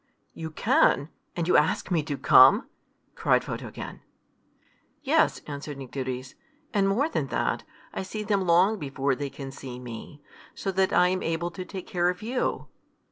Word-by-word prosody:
"You 160 -1 -6
can! 150 -1 +3 0.3
and 170 -1 -1
you - - +4
ask - - +1
me 170 -3 +3
to 145 -3 -3
come!" - - +7 0.5
cried - - +2
Photogen. - - -7 1.0
"Yes," - - +2
answered 145 0 -6
Nycteris. 130 -1 -5 0.4
"And 195 -2 +3
more 245 +10 +2
than - - -2
that, - - -1 0.3
I - - -3
see 210 +3 -5
them 200 -3 0
long 185 +5 +4
before 135 -2 -1
they 140 +2 -3
can 135 0 -8
see 130 -2 -8
me, 125 +3 -9 0.4
so 195 - -2
that 190 0 +2
I 180 0 +5
am 185 0 -1
able 165 +1 -2
to 185 +2 -6
take 185 0 -7
care 175 -1 +1
of 180 +3 -4
you." 250 +3 -1
170 Hz, 165 wpm, -27 LUFS, 140-190 Hz, 1.0 s, come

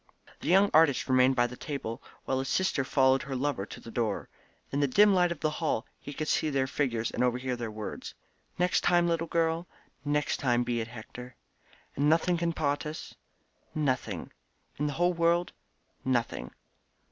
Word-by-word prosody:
_" - - -22
The - - -7
young 195 +4 +5
artist 155 -4 +4
remained 130 0 +4
by 120 -1 +3
the 125 +1 -5
table, 135 -4 -5 0.2
while 130 - 0
his 135 - -3
sister 185 -7 +1
followed 130 0 +3
her 140 -2 -5
lover 130 -6 -1
to - - -9
the 115 - -11
door. 110 -3 -2 0.4
In 140 - -1
the 145 - +3
dim 205 +9 +5
light 180 -2 +3
of 170 - -5
the 155 - +1
hall 145 -7 0
he 145 - -8
could 155 +2 -4
see 155 - +1
their 135 -2 +1
figures 125 -4 -1
and 125 - 0
overhear 125 +1 0
their 120 -2 -4
words. 110 0 -7 0.4
"Next 180 0 +2
time, 175 -1 +3
little 165 0 0
girl?" 165 +1 0 0.4
"Next 150 0 0
time 120 -2 +2
be 120 -1 -1
it, 115 - -4
Hector." 120 +1 -10 0.6
"And 145 +2 +2
nothing 170 +2 +3
can 170 0 0
part 145 -3 -1
us?" 155 - -7 0.6
"Nothing." 130 - -1 0.5
"In 150 - +1
the 145 - -2
whole 175 +4 +2
world?" 170 +1 +1 0.5
"Nothing." 125 -3 -1
140 Hz, 185 wpm, -29 LUFS, 125-165 Hz, 0.6 s, young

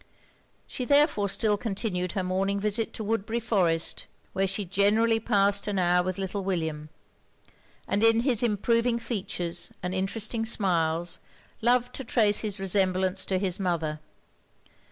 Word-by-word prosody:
She 255 - -5
therefore 285 -7 +3
still 205 +1 +1
continued 195 -4 -3
her 195 -3 -1
morning 195 +2 -1
visit 215 +2 0
to 220 - -5
Woodbury 225 +2 -1
Forest, 185 -8 0 0.3
where 195 +1 +1
she 195 +2 -2
generally 210 +5 +2
past 200 -2 +2
an 205 -1 -1
hour 180 -1 +3
with 185 0 -3
little 195 +1 -3
William; 160 -5 -3 1.0
and 205 +2 0
in 225 0 +5
his 245 -3 +2
improving 230 +1 +1
features 195 -7 -3
and 180 0 -2
interesting 215 +4 -1
smiles, 175 -6 0 0.4
loved 245 +1 +2
to 270 - -4
trace 220 -4 +3
his 210 -3 -3
resemblance 190 -1 +1
to 190 - 0
his 185 -1 -1
mother. 165 -5 -2
200 Hz, 140 wpm, -27 LUFS, 185-225 Hz, 1.0 s, in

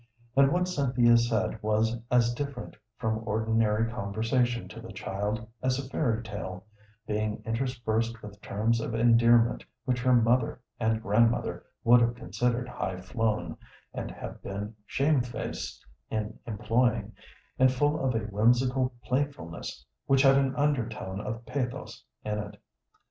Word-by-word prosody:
And 135 0 +6
what 180 +2 +2
Cynthia 125 -8 +3
said 110 -2 +1
was 110 +1 +1
as 120 -1 +3
different 140 -1 -5 0.2
from 110 -1 -1
ordinary 110 0 +1
conversation 120 +3 0
to 115 +1 -9
the 115 - -9
child 105 +3 -3
as 130 0 +1
a 135 -1 -4
fairy 120 -5 0
tale, 100 -3 -6 0.4
being 105 0 -2
interspersed 115 -1 -1
with 105 0 -10
terms 115 +3 0
of 115 - -3
endearment 115 0 +4 0.2
which 125 -2 0
her 125 0 +4
mother 120 +1 +2 0.2
and 110 -1 +1
grandmother 115 +3 +2 0.2
would 120 +1 +7
have 120 0 +2
considered 120 +4 -1
high 95 -7 -4
flown, 110 +2 -1 0.4
and - - -4
have - - -8
been 100 +2 -5
shamefaced 135 -4 -1 0.2
in 110 -1 -2
employing, 115 0 +1 0.5
and 130 0 +6
full 145 +3 +1
of 130 -3 +1
a 115 - +1
whimsical 125 +5 +2
playfulness 125 - -3 0.2
which 135 0 +4
had 135 -1 +7
an 135 -1 +2
undertone 115 -9 -1
of 115 +2 -5
pathos 125 -1 -4 0.2
in 105 0 -1
it. 105 -1 -7
115 Hz, 140 wpm, -28 LUFS, 110-125 Hz, 0.5 s, would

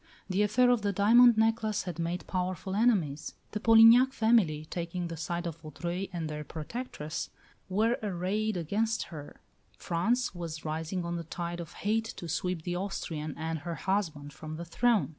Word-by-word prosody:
The 190 +1 +1
affair 245 +4 +4
of 245 -3 +2
the 205 0 0
diamond 230 +4 +6
necklace 220 -1 +1
had 175 -2 -6
made 170 0 -2
powerful 185 0 -3
enemies; 195 - +1 0.2
the 210 - -3
Polignac 230 +4 +7
family, 215 - +3
taking 170 +1 -4
the 165 - -5
side 170 +2 -3
of 165 -2 -4
Vaudreuil 175 +5 -4
and 170 -3 -3
their 150 0 -5
protectress, 155 - -5 0.4
were 220 +5 +2
arrayed 205 +1 -1
against 215 +7 0
her; 145 -2 -9 0.4
France 230 +9 0
was 165 -3 -6
rising 160 +3 -3
on 170 0 -2
the 170 - -4
tide 170 +1 -5
of 170 -2 -7
hate 225 +1 0
to 170 - -6
sweep 180 0 -2
the 175 +1 -2
Austrian 160 -5 -4
and 160 0 -3
her 170 +3 -5
husband 160 -8 -2
from 155 +1 -7
the 170 +2 -6
throne. 225 +4 +2
180 Hz, 170 wpm, -30 LUFS, 165-215 Hz, 0.4 s, Polignac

